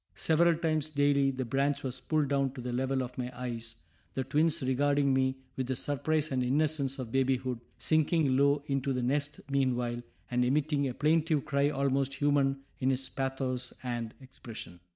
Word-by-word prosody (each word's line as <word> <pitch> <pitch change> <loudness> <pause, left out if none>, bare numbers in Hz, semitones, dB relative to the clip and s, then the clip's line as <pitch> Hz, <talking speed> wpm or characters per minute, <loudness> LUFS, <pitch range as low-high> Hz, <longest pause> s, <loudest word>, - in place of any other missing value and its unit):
Several 165 +1 +3
times 155 -2 0
daily 145 -2 +3
the 130 -1 -3
branch 135 +4 0
was 130 -1 -3
pulled 155 -3 0
down 140 -2 +1
to 130 - -7
the 125 0 -4
level 130 +1 0
of 125 +1 -7
my 125 0 -3
eyes, 115 -2 -4 0.4
the 130 - 0
twins 150 +3 +1
regarding 140 +1 +2
me 130 0 +1 0.2
with 130 -2 -2
the 130 - -1
surprise 150 +3 0
and 130 -1 +1
innocence 140 +1 +1
of 125 -4 -6
babyhood, 130 -2 0 0.2
sinking 155 -3 +2
low 140 +1 +3
into 135 -1 -1
the 125 -1 -1
nest 145 +3 -1
meanwhile, 125 -3 0 0.3
and 125 0 +2
emitting 140 +2 +1
a 125 - -4
plaintive 155 -1 +2
cry 140 -1 +2
almost 135 -1 0
human 140 -1 +2 0.2
in 130 - +1
its 135 0 -1
pathos 130 -1 -2
and 120 -3 -3
expression. 115 -9 -10
135 Hz, 170 wpm, -30 LUFS, 130-145 Hz, 0.4 s, Several